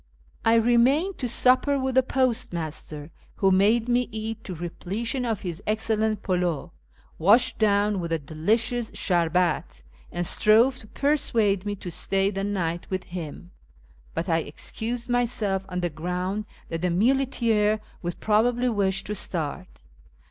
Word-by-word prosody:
I 225 0 +4
remained 245 - +3
to 250 - -1
supper 255 +4 +3
with 265 0 -1
the 260 - +5
postmaster, 175 - -2 0.2
who 195 -1 +3
made 215 +5 +3
me 245 0 +1
eat 220 +1 -5
to 185 - -5
repletion 205 - -3
of 220 -4 -1
his 175 -3 -5
excellent 220 -1 0
pildiu, 180 -5 -1 0.5
washed 220 +10 +4
down 205 -1 +2
with 170 -1 -4
a 165 - +2
delicious 220 - -1
sherbet, 175 - 0 0.3
and 175 0 -2
strove 230 +8 +4
to 220 - -13
persuade 225 -9 +1
me 205 - -1
to 180 -2 -7
stay 195 +3 0
the 195 -1 -3
night 175 -4 -2
with 185 -1 -2
him; 175 0 -8 0.6
but 165 +3 -2
I 165 -2 +2
excused 230 - -4
myself 220 -6 0
on 180 0 -3
the 175 -1 -1
ground 180 +6 -3 0.2
that 165 -1 -3
the 180 - +1
muleteer 225 0 +2 0.2
would 175 -1 -4
probably 240 +4 +2
wish 195 -3 0
to 210 - -4
start. 180 -2 -5
205 Hz, 145 wpm, -25 LUFS, 180-235 Hz, 0.6 s, the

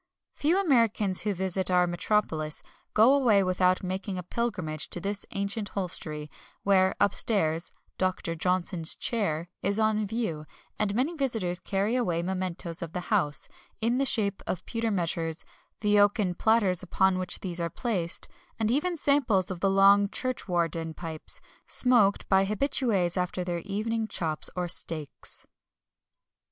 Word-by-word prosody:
Few 330 +6 +1
Americans 230 - +2
who 210 -1 -1
visit 190 0 -1
our 180 -1 +4
metropolis 175 -4 0 0.3
go 225 +5 +6
away 235 -8 +4
without 185 0 +2
making 190 +1 -3
a 180 - -4
pilgrimage 180 -7 -3
to - - -4
this 200 +3 -3
ancient 200 -1 -2
hostelry, 155 -5 -3 0.3
where, 190 -1 +3
upstairs, 170 -5 +1 0.3
"Doctor 185 -2 -1
Johnson's 175 0 0
Chair" 175 -8 -1
is 200 +1 +1
on 215 -1 +1
view; 185 -9 -3 0.3
and 205 -1 0
many 275 +8 0
visitors 225 - -1
carry 200 +4 -1
away 175 -9 0
mementoes 180 -2 -3
of 165 -2 -6
the 180 +4 -3
house, 150 -8 +1 0.3
in 235 +3 +1
the 275 - +2
shape 205 -6 0
of 180 - -3
pewter 230 -1 -2
measures, 170 -3 -2 0.4
the 210 -1 +3
oaken 205 -2 +3
platters 205 -3 +2
upon 185 +1 +1
which 185 - -2
these 180 -2 -4
are 170 0 -1
placed, 180 -3 -2 0.3
and 220 0 0
even 335 +7 0
samples 235 - +2
of 180 - -5
the 195 - +2
long 200 +1 +5
"churchwarden" 170 - -2
pipes, 160 -2 -6 0.3
smoked 235 -6 +3
by 190 0 +4
habitués 205 -4 0
after 180 0 -1
their 175 -1 -2
evening 215 +4 -2
chops 160 -7 0
or 180 -1 -1
steaks. 160 -3 +2
190 Hz, 145 wpm, -28 LUFS, 175-220 Hz, 0.4 s, go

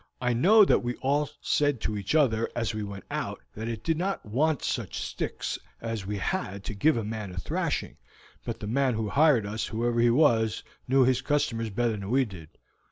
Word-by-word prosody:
I 125 -1 +1
know 200 - +6
that - - +3
we 120 0 -2
all 145 +2 0
said 145 -4 +1
to 105 - -2
each 100 +7 -2
other 115 -7 +3
as 115 -3 -1
we 110 - -3
went 100 -2 -6
out - - -4
that 110 +2 -5
it 115 -2 -4
did 160 -1 0
not 195 +2 -2
want 140 +7 +1
such - - -2
sticks - - -3 0.2
as 115 -4 -4
we 105 0 -2
had 100 - -3
to 110 - -5
give 145 +8 +3
a 115 - -1
man 105 -1 -4
a 90 - -10
thrashing, 90 - -2 0.5
but 115 -1 -5
the - - -4
man 130 +2 +1
who 110 -1 -2
hired 140 -6 +4
us, 105 +2 -3
whoever 120 +1 -1
he 120 0 +5
was, 115 -5 +3 0.2
knew 130 +1 +5
his 130 0 +2
customers 115 -6 0
better 120 +3 0
than 100 -2 -5
we 130 +2 +3
did." 90 -8 -11
115 Hz, 210 wpm, -27 LUFS, 110-140 Hz, 0.5 s, know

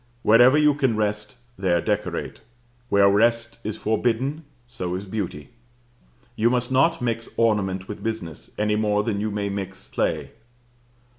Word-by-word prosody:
Wherever 120 +6 +6
you 150 -1 +5
can 135 -6 0
rest, 105 +1 -2 0.2
there 90 -3 +1
decorate; - - -3 0.5
where 100 -2 +5
rest 115 +3 +2
is 105 0 -4
forbidden, 125 +7 -1 0.2
so 90 -7 -4
is 95 +2 -5
beauty. 95 -7 -5 0.9
You 115 +2 +3
must 125 0 0
not 160 +4 +3
mix 115 -1 -2
ornament 95 -4 +1
with 105 - -7
business, 110 -8 -5
any 105 0 +1
more 105 -1 +1
than 105 -2 -1
you 110 - -1
may 100 -1 -2
mix 95 -1 -5
play. - - -2
110 Hz, 145 wpm, -24 LUFS, 100-120 Hz, 0.9 s, Wherever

